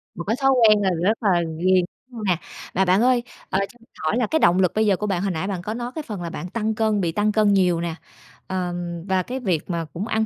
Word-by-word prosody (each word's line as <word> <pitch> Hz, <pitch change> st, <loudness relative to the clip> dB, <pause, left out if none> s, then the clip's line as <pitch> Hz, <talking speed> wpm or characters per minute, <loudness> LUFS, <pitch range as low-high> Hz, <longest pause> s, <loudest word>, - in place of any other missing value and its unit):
Một 170 Hz, -, -5 dB
cái 215 Hz, +6 st, 0 dB
thói 270 Hz, 0 st, +5 dB
quen 220 Hz, -5 st, +5 dB
là 195 Hz, -, +2 dB
rất 215 Hz, +5 st, +1 dB
là 185 Hz, -4 st, +3 dB, 0.2 s
ghiền 185 Hz, +1 st, +3 dB, 0.3 s
hông 230 Hz, -3 st, -7 dB
nè? 185 Hz, -4 st, +2 dB, 0.4 s
Mà 190 Hz, -, +3 dB
bạn 185 Hz, +3 st, +4 dB
ơi, 245 Hz, 0 st, +3 dB, 0.3 s
ờ, 190 Hz, -, +1 dB
cho 195 Hz, +4 st, -4 dB
mình 230 Hz, -, -24 dB
hỏi 155 Hz, +9 st, +1 dB
là 245 Hz, -3 st, +1 dB
cái 315 Hz, -, +1 dB
động 175 Hz, -, +4 dB
lực 185 Hz, -2 st, +3 dB
bây 220 Hz, 0 st, +3 dB
giờ 200 Hz, -2 st, +4 dB
của 210 Hz, -, -3 dB
bạn, 185 Hz, -3 st, 0 dB
hồi 195 Hz, 0 st, 0 dB
nãy 175 Hz, +2 st, -3 dB
bạn 190 Hz, -3 st, -3 dB
có 210 Hz, +4 st, -4 dB
nói 240 Hz, +1 st, -4 dB
cái 315 Hz, -, -4 dB
phần 205 Hz, -5 st, -5 dB
là 170 Hz, -, -4 dB
bạn 175 Hz, +1 st, -6 dB
tăng 220 Hz, +1 st, -1 dB
cân, 215 Hz, -2 st, +1 dB
bị 170 Hz, -2 st, 0 dB
tăng 210 Hz, +5 st, +1 dB
cân 210 Hz, -1 st, +3 dB
nhiều 180 Hz, -3 st, +3 dB
nè, 170 Hz, -1 st, -3 dB, 0.5 s
ờm, 175 Hz, -2 st, -3 dB
và 190 Hz, -1 st, +2 dB
cái 255 Hz, +6 st, -4 dB
việc 185 Hz, -, -1 dB
mà 170 Hz, -2 st, -2 dB
cũng 195 Hz, +6 st, -4 dB
ăn 220 Hz, -1 st, +1 dB
195 Hz, 280 wpm, -23 LUFS, 175-220 Hz, 0.5 s, thói